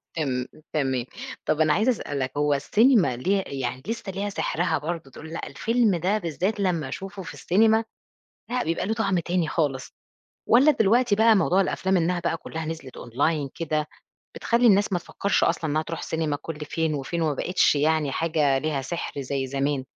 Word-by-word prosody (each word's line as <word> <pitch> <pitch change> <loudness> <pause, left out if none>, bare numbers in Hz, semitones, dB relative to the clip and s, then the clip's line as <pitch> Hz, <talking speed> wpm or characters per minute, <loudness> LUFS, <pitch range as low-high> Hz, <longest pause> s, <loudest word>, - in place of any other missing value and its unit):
تم 130 -6 -1 0.3
تمام 130 -5 0 0.4
طب 155 - +1
أنا 155 -1 +4
عايزة 220 +10 +3
أسألك، 140 - -3
هو 145 0 +2
السينما 210 - +3
ليه 195 +8 +1
يعني 130 -2 -4
لسّه 225 -3 -4
ليها 200 +2 -3
سحرها 180 -3 -1
برضه 160 -1 -5
تقول 160 +4 -10
لأ 165 - -5
الفيلم 230 -4 +1
ده 185 +5 +1
بالذات 185 +4 -2
لمَّا 170 -8 0
أشوفه 195 +5 -6
في - - -8
السينيما 220 +4 +3 0.7
لأ، 250 +1 0
بيبقى 165 +2 -1
لُه 220 - 0
طعم 195 -5 +1
تاني 175 -1 0
خالص، 145 -5 -1 0.6
والَّا 260 +7 +7
دلوقتي 235 -2 +3
بقى 220 +1 +5
موضوع 190 +1 +3
الأفلام 190 0 0
إنها 175 +1 +1
بقى 165 - -1
كلَّها 160 0 -6
نزلت 155 -5 -7
Online 145 +4 -1
كده 155 -2 -1 0.5
بتخلِّي 240 +1 +2
الناس 205 -2 +4
ما 175 - +2
تفكّرش 200 +3 0
أصلًا 160 -3 0
إنّها 155 +1 +1
تروح 165 0 -6
سينيما 160 -2 -1
كل 150 +1 -7
فين 160 0 -1
وفين، 150 +4 -3
وما 155 -3 +1
بقِتش 180 +4 +2
يعني 150 -1 +1
حاجة 155 -4 +1
ليها 145 -1 -2
سحر 145 -1 -4
زي 135 0 -2
زمان، 135 0 -1
165 Hz, 175 wpm, -25 LUFS, 145-195 Hz, 0.7 s, والَّا